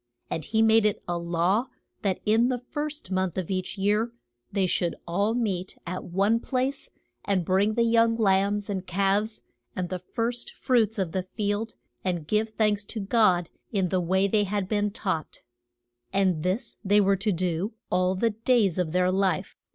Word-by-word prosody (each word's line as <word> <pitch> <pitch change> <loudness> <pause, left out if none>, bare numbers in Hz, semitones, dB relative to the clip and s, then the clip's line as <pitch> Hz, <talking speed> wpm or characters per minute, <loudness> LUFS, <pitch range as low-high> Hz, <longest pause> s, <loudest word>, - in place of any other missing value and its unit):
And 160 - -3
he 220 0 +2
made 220 -1 +5
it 210 - -2
a 175 - -1
law 175 +8 +1 0.3
that 195 -3 0
in 225 +3 +4
the 255 - 0
first 295 -1 -5
month 185 -2 0
of 185 0 -2
each 185 +1 -3
year 210 +4 +1 0.4
they 195 -1 +1
should 175 -1 0
all 200 +6 +1
meet 195 -6 -2
at 185 +1 -4
one 200 +6 +2
place, 260 +2 -2 0.3
and 190 -4 0
bring 200 +4 +2
the 235 - +3
young 230 0 +4
lambs 200 -1 +2
and 195 -3 -4
calves 200 +4 0 0.3
and 180 -2 -2
the 185 - -3
first 230 +6 -3
fruits 225 -3 +2
of 185 -4 -1
the 190 - -1
field 205 +3 -3 0.3
and 175 -4 -2
give 215 +6 +1
thanks 210 -2 +1
to 220 - -6
God 195 -5 +2 0.2
in 190 -4 +1
the 185 0 +1
way 190 +3 +2
they 205 +1 +2
had 200 -1 -2
been 205 0 +1
taught. 190 -7 -4 0.7
And 190 -5 +2
this 200 +8 -2
they 205 +1 +4
were 195 -1 +3
to 210 +3 0
do 180 +3 -1 0.2
all 185 +1 +2
the 230 +4 +1
days 215 -4 +2
of 165 -3 -1
their 180 0 +3
life. 190 -3 0
200 Hz, 180 wpm, -26 LUFS, 185-220 Hz, 0.7 s, made